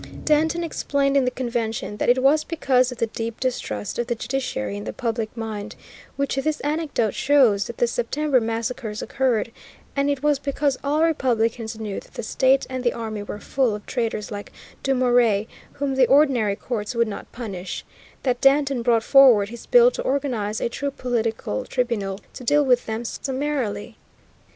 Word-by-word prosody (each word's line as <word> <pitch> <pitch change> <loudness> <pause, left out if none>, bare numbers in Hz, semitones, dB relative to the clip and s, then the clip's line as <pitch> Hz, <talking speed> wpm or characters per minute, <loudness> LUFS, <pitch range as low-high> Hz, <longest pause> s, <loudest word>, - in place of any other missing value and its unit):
Danton 315 +3 +2
explained 280 -3 0
in 275 -2 +4
the - - +2
Convention 235 -4 -3
that - - 0
it 255 +1 +4
was 300 +3 +4
because 260 -6 +1
of 250 - -7
the 230 - +1
deep 225 0 -5
distrust 110 - -3
of 240 - -1
the 240 - -1
judiciary 220 - -3
in 100 +1 -6
the 110 - -4
public 230 -1 -3
mind, 215 -2 -5 0.4
which 280 0 -1
this 305 +3 0
anecdote 290 -8 -1
shows, 255 -8 +3
that 235 - -8
the - - +3
September 255 +3 0
massacres 225 -1 -3
occurred, 240 -4 0 0.4
and 280 0 +1
it 280 -1 -1
was 295 -2 +3
because 280 0 0
all 295 +3 +2
republicans 230 -7 0
knew 210 -3 -4
that - - -18
the - - -4
state 265 +4 +2
and 260 -1 -4
the 240 - +2
army 220 -2 -4
were 205 - -6
full 250 -1 0
of 210 - -9
traitors 225 -4 -2
like 205 0 -6 0.3
Dumouriez, 245 -5 +3 0.3
whom 280 -1 -2
the 265 -2 +4
ordinary 255 -7 +4
courts 225 +1 -4
would 235 0 +2
not 205 - -7
punish, 195 -7 -6 0.4
that 250 -2 0
Danton 275 -2 +3
brought 230 -1 +2
forward 245 -8 +6
his 235 0 -10
bill - - +6
to - - -5
organize 245 -6 -1
a - - 0
true 280 +4 -3
political 230 - -2
tribunal 215 -6 -2
to - - -9
deal 290 +4 +3
with 250 -2 +2
them 225 +2 -3
summarily. 260 -6 -3
245 Hz, 175 wpm, -23 LUFS, 220-275 Hz, 0.4 s, forward